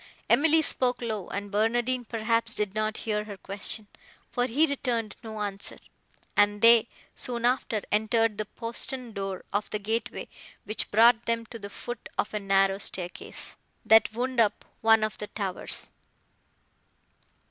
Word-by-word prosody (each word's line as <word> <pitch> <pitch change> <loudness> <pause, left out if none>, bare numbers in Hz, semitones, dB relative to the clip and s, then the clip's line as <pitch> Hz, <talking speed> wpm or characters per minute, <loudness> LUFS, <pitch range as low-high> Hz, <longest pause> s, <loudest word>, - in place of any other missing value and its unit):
Emily 320 +2 +5
spoke 250 -4 +1
low, 220 -5 -3
and 200 0 -5
Barnardine, 240 +4 +1
perhaps, 230 0 0
did 210 -2 -2
not 215 0 -1
hear 210 -1 -1
her 205 -2 -8
question, 200 +3 +1 0.5
for 245 -1 +1
he 285 +7 +3
returned 245 -7 -2
no 220 -1 -6
answer; 200 -1 -4 0.6
and 205 0 +3
they, 230 0 +7 0.3
soon 240 -1 +1
after, 240 -4 +1
entered 220 0 +2
the 215 - -1
postern 235 +2 -3
door 195 -2 -4
of 205 +1 -1
the 210 - -2
gateway, 220 +3 -3 0.4
which 215 - -2
brought 230 +2 +5
them 230 0 0
to 230 +1 -9
the 200 -1 -7
foot 240 +3 -7
of 210 - -1
a 210 - -1
narrow 195 -1 +2
staircase 180 -3 -2 0.3
that 220 -1 +6
wound 250 +2 -2
up 210 -2 +2 0.2
one 225 -1 +5
of 215 - -2
the 210 - -4
towers. 195 -4 -4
220 Hz, 150 wpm, -27 LUFS, 205-235 Hz, 0.6 s, they